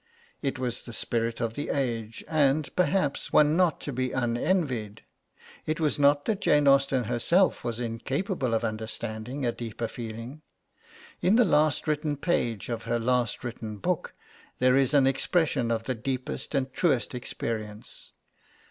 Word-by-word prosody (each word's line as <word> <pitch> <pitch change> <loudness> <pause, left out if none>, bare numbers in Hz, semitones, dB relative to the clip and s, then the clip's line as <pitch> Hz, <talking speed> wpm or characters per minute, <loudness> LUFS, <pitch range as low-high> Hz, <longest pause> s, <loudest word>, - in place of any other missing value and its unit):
It 135 -3 -1
was 125 -2 -2
the 120 - -10
spirit 115 0 -2
of 115 -2 -1
the 145 - -4
age, 115 -5 -2
and, 150 -1 +1
perhaps, 180 -5 +1
one 150 +1 +5
not 180 -2 +3
to 145 - -5
be 130 +1 -1
unenvied. 120 - -1 0.6
It 155 +2 -1
was 150 -2 +1
not 145 0 +4
that 210 -3 -1
Jane 150 -4 +4
Austen 135 -2 +4
herself 145 - +2
was 120 -1 -3
incapable 130 - -2
of 115 - 0
understanding 110 +3 -4
a 120 - +2
deeper 115 -1 -5
feeling. 115 +6 -7 0.8
In 190 +4 +4
the 245 0 +6
last 155 -3 +2
written 150 -1 0
page 120 - -1
of 115 -2 -4
her 120 +1 0
last 120 0 0
written 110 -3 -5
book, 100 - -2 0.4
there 125 0 +4
is 135 +1 +3
an 140 -2 +6
expression 135 -2 +1
of 115 -1 0
the 130 - -2
deepest 130 +4 -4
and 135 -1 -1
truest 140 -9 +1
experience. 110 -3 -5
130 Hz, 155 wpm, -27 LUFS, 115-150 Hz, 0.8 s, the